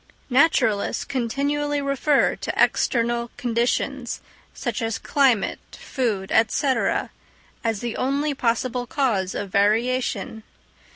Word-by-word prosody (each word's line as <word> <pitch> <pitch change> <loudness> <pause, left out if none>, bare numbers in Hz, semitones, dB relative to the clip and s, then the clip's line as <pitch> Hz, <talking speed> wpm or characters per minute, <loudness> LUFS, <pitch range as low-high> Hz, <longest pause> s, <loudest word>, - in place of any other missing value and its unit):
Naturalists 245 -7 +2
continually 285 +3 -1
refer 275 +1 +2
to - - -4
external 235 0 +2
conditions, 240 +1 -1 0.3
such - - -4
as 225 -1 -1
climate, 260 -8 +2
food, 215 -8 -3 0.2
&c., 280 - -1 1.0
as 225 -3 -1
the 240 -1 -3
only 285 +3 0
possible 245 0 -1
cause 210 -11 0
of 200 -2 -4
variation. 225 +3 +1
245 Hz, 100 wpm, -23 LUFS, 225-275 Hz, 1.0 s, Naturalists